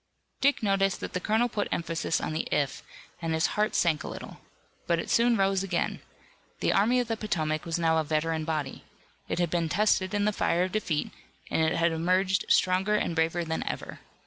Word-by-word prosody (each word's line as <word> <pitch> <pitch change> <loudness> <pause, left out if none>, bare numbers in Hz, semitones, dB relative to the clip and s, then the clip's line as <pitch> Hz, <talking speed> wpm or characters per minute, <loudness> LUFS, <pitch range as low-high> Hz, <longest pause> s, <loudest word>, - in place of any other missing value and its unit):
Dick 280 -3 +2
noticed 195 -1 +2
that - - -5
the 180 - -1
colonel 220 +5 +2
put 210 -3 -2
emphasis 165 -1 -1
on - - -3
the 160 - -2
"if" 145 -2 0 0.4
and 165 -1 -1
his 160 - +2
heart 210 +1 0
sank 160 -4 +2
a - - -6
little. - - -8 0.5
But 170 - +2
it 165 - -4
soon 235 0 +4
rose 195 -1 +2
again. 195 -1 -2 0.6
The - - +1
Army 230 +6 +3
of 245 - -1
the 225 - -1
Potomac 155 -7 -2
was 165 0 -1
now 165 -1 +2
a - - +1
veteran 155 +1 -1
body. 155 -3 -3 0.5
It - - -1
had 175 -2 0
been 170 -2 0
tested 200 +2 +2
in 205 0 +1
the 210 - +1
fire 175 -2 +1
of 185 - -2
defeat, 180 -8 -1 0.4
and - - +1
it 160 +1 +2
had 170 0 +2
emerged 185 +4 +1
stronger 190 +3 +3
and 190 - 0
braver 165 +1 +1
than 160 0 -2
ever. - - -5
175 Hz, 205 wpm, -28 LUFS, 160-205 Hz, 0.6 s, soon